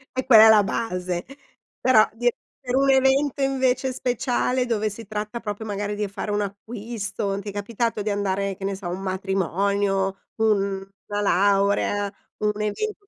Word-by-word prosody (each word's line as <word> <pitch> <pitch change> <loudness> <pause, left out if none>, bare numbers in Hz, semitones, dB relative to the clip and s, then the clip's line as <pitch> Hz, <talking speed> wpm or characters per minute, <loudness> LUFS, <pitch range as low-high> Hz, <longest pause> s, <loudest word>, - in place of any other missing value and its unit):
E 260 - -1
quella 225 -4 +9
è - - +8
la 210 -2 +7
base, 180 -4 -2 0.6
però 230 -4 +5
di 245 +1 +1 0.4
per 250 - 0
un 275 +1 +3
evento 270 +1 +3
invece 265 -1 +1
speciale, 250 0 0
dove 215 -3 0
si 215 +1 -9
tratta 215 +2 -4
proprio 210 0 -5
magari 205 0 -3
di 210 - -2
e - - -1
fare 205 +1 -4
un 205 - 0
acquisto, 205 -1 -4
ti 205 - -6
è - - -5
capitato 220 +2 -2
di 210 - -2
andare, 200 -1 -1
che 195 - -6
ne 195 0 -1
so, 190 -1 -11
a - - -3
un 180 +2 -4
matrimonio, 195 +1 0 0.2
un 200 -3 +1 0.2
una 205 0 -2
laurea, 200 +1 +2 0.3
un 210 0 0
evento 405 - -3
210 Hz, 175 wpm, -24 LUFS, 200-235 Hz, 0.6 s, quella